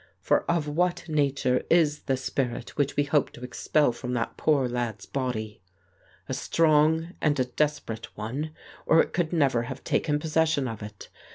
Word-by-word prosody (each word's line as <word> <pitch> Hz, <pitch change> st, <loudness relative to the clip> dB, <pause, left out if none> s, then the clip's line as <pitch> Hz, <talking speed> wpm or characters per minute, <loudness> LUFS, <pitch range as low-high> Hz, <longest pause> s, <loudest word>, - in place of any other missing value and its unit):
For -, -, +1 dB
of 170 Hz, -3 st, +1 dB
what 175 Hz, +3 st, 0 dB
nature 140 Hz, -4 st, +1 dB
is 155 Hz, -3 st, +3 dB
the 135 Hz, -2 st, +1 dB
spirit 125 Hz, -2 st, -3 dB
which 145 Hz, -1 st, 0 dB
we 145 Hz, -, +3 dB
hope 145 Hz, 0 st, +1 dB
to 120 Hz, -, -11 dB
expel 130 Hz, +3 st, +1 dB
from 125 Hz, +1 st, -5 dB
that 115 Hz, -2 st, -2 dB
poor 145 Hz, -5 st, +2 dB
lad's 120 Hz, -3 st, -3 dB
body? 110 Hz, -7 st, -3 dB, 0.7 s
A -, -, -3 dB
strong 160 Hz, +1 st, +2 dB
and 150 Hz, -2 st, +2 dB
a 130 Hz, -, +3 dB
desperate 125 Hz, -5 st, -2 dB
one, 125 Hz, +9 st, -3 dB, 0.4 s
or 160 Hz, -, +6 dB
it -, -, -3 dB
could 170 Hz, -3 st, 0 dB
never 140 Hz, -8 st, +2 dB
have 130 Hz, 0 st, -7 dB
taken 150 Hz, -2 st, +1 dB
possession 155 Hz, -2 st, +1 dB
of 110 Hz, -2 st, -6 dB
it. 105 Hz, -1 st, -9 dB
140 Hz, 170 wpm, -27 LUFS, 125-155 Hz, 0.7 s, or